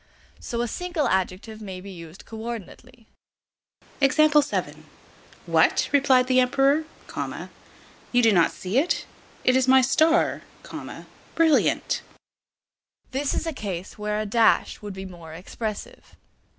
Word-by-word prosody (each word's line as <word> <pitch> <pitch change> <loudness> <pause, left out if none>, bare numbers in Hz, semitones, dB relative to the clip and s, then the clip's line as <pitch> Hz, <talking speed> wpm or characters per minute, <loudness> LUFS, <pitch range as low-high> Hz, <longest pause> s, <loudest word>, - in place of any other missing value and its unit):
So 235 0 -3
a 240 - -1
single 350 +2 -2
adjective 190 +4 -2
may 190 -3 -7
be 195 +2 -10
used 170 -1 -11
co 225 - -9
ordinately: 230 +1 -8 2.4
"What!" - - +3
replied 270 -3 +4
the 255 0 +3
Emperor, 275 +4 +3 1.3
"you 245 0 +3
do 225 - +6
not 175 -4 +4
see 195 +7 -1
it? 330 +5 0 0.4
It 255 - +3
is 260 0 +3
my 265 0 +7
star, 320 +6 +2 0.9
brilliant." 325 -2 +2 1.1
This 270 +1 -1
is - - -2
a 325 - -2
case 195 -6 -6
where 210 0 -2
a 215 - -2
dash 225 +2 +2
would 205 -2 -7
be 190 0 -7
more 170 -4 -11
expressive. 210 +4 -7
230 Hz, 125 wpm, -24 LUFS, 195-270 Hz, 2.4 s, my